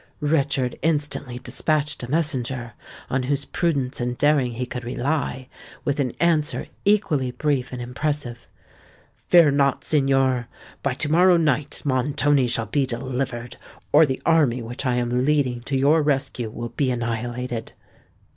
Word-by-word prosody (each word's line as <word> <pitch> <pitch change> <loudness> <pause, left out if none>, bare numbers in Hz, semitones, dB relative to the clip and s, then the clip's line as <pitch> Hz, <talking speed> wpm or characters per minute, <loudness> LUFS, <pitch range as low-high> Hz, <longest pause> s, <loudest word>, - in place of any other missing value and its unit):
Richard 140 -4 0
instantly 145 -5 -1
despatched 150 +2 -1
a 120 - -6
messenger, 130 -6 -1 0.3
on 130 - 0
whose 140 +2 -1
prudence 140 -8 -1
and 120 0 -2
daring 145 -5 +2
he 125 +2 -3
could 125 0 -6
rely, 130 +1 -2 0.4
with 145 0 0
an 130 -4 0
answer 160 -3 +1 0.2
equally 195 -11 +2
brief 135 0 -1
and 125 - -5
impressive:— 125 -1 -4 0.8
"Fear 170 -5 +6
not, 140 -1 +1
signor! 135 -4 +2 0.3
By 140 -2 -1
to 150 +2 -2
morrow 180 +2 +5
night 150 -2 0
Montoni 140 0 +2
shall 115 -1 0
be 140 +1 0
delivered, 125 -1 -4 0.3
or 155 +1 +6
the 130 - -2
army 150 -7 +3
which 120 +4 -5
I 125 - +1
am 125 +1 0
leading 135 -4 +1
to 135 - +1
your 145 +4 +4
rescue 135 -5 -1
will 120 +2 -6
be 135 +1 -1
annihilated. 120 0 -3
135 Hz, 145 wpm, -23 LUFS, 125-150 Hz, 0.8 s, Fear